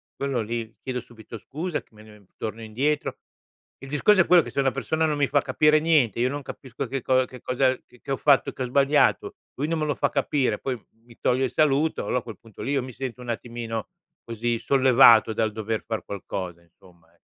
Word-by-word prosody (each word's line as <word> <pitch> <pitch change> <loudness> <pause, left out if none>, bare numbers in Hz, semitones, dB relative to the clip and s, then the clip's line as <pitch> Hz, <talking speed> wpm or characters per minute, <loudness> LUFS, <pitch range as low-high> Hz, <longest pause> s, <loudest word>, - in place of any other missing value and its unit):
quello 135 -3 -1
lì 115 0 -5
chiedo 130 -1 -3
subito 115 -1 -11
scusa, 160 - -4
che - - -34
me 105 -1 -16
torno 110 +1 -5
indietro. 135 +7 -1 0.6
Il 135 - -10
discorso 185 +8 +4
è - - +2
quello 180 -1 +7
che - - -8
se - - -3
una 135 -1 +2
persona 145 +5 -1
non 155 -1 0
mi 145 -1 +2
fa 145 +1 +2
capire 150 +2 +3
niente, 150 - +2
io 125 +2 +2
non 145 +2 -4
capisco 130 0 -7
che 135 +2 -3
cosa 130 0 +3
che 125 -1 -12
cosa 130 +1 +1
che 125 - -24
ho 135 - 0
fatto 140 -1 +3
che 130 - -4
ho - - -1
sbagliato. 140 +3 +2 0.2
Lui 145 +3 -2
non 165 +1 -1
me 155 - 0
lo 150 - 0
fa - - +1
capire, 130 -7 0
poi 130 -3 -3 0.3
mi 120 -1 -17
toglie 130 +2 +1
il 130 - -4
saluto, 155 +1 +2
allora, 125 - 0
a - - -10
quel 110 -5 -10
punto 110 -3 -14
lì, 135 - -2
io 140 -2 +1
mi 130 0 -8
sento 125 0 -6
un 125 - -8
attimino 115 -1 -4 0.3
così 115 +1 -2
sollevato 125 -2 +6
dal 110 0 0
dover 110 +1 -3
far 110 -1 -3
qualcosa, 95 -3 -6
insomma, 85 -1 -23
e - - -31
125 Hz, 220 wpm, -25 LUFS, 115-140 Hz, 0.6 s, quello